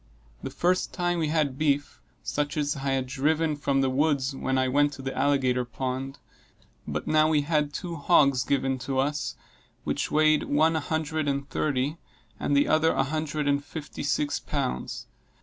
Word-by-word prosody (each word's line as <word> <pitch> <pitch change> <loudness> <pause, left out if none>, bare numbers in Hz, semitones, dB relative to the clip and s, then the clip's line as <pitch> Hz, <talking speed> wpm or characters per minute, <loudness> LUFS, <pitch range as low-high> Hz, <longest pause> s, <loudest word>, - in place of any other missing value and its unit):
The - - -4
first 180 +1 0
time 175 -1 0
we 160 - 0
had 150 -4 0
beef, 145 -2 0 0.2
such 145 +1 -2
as 145 -1 0
I 135 0 -1
had 130 -1 0
driven 150 +4 0
from 140 -1 0
the 135 - +2
woods 140 -1 +1
when 130 0 -1
I 130 0 +2
went 145 +2 +2
to 135 - -9
the 135 - -4
alligator 130 -3 +2
pond; 130 +2 -4 0.7
but - - -3
now 155 0 +3
we 155 -2 +3
had 150 -1 0
two 170 +1 -5
hogs 140 -4 +4
given 135 -1 0
to 130 +1 -3
us, 145 +2 -1 0.5
which - - -2
weighed, 155 0 +3
one 155 +3 +3
a - - +2
hundred 155 0 -2
and 140 0 -1
thirty, 145 +2 -1 0.4
and 145 - +1
the 140 - +3
other 160 +1 +3
a 135 - +2
hundred 150 0 -2
and 140 0 +1
fifty 150 0 -7
six 145 0 0
pounds. 65 0 -3
145 Hz, 180 wpm, -27 LUFS, 135-155 Hz, 0.7 s, hogs